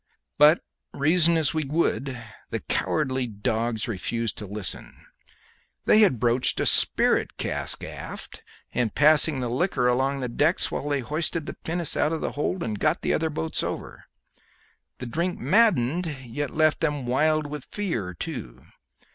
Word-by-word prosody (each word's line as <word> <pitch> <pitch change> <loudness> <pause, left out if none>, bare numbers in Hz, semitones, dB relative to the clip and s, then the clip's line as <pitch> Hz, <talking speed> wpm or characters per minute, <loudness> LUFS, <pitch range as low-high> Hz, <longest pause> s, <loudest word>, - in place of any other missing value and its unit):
But 150 +3 +7 0.3
reason 165 +3 +3
as 155 -2 +1
we 155 -1 0
would 140 -3 -1 0.3
the - - -2
cowardly 130 -4 -1
dogs 110 +1 -2
refused 115 +1 -2
to 105 - -7
listen. 100 0 -6 0.8
They 215 - +6
had 195 - +4
broached 120 +2 +3
a - - +1
spirit - - +3
cask - - -2
aft, - - -7 0.3
and 120 -4 -1
passed 150 +1 +6
the 130 -5 -2
liquor 125 +1 0
along 135 +3 +1
the 125 - -2
decks 145 +8 +1
whilst 145 - -3
they 140 -2 0
hoisted 155 +4 -2
the - - -5
pinnace 170 -1 -3
out 150 +2 +1
of 160 - -3
the - - -2
hold 170 +5 -2
and 105 -3 -3
got - - +1
the - - +1
other 160 0 0
boats 80 - -2
over. - - -6 0.9
The 125 - -7
drink 170 +9 -2
maddened, 180 - +3 0.2
yet 135 +4 -3
left 155 +1 +2
them 150 -5 -1
wild 155 +5 +2
with 145 -1 -7
fear 120 - -3
too. 60 -5 -7
145 Hz, 155 wpm, -25 LUFS, 120-160 Hz, 0.9 s, But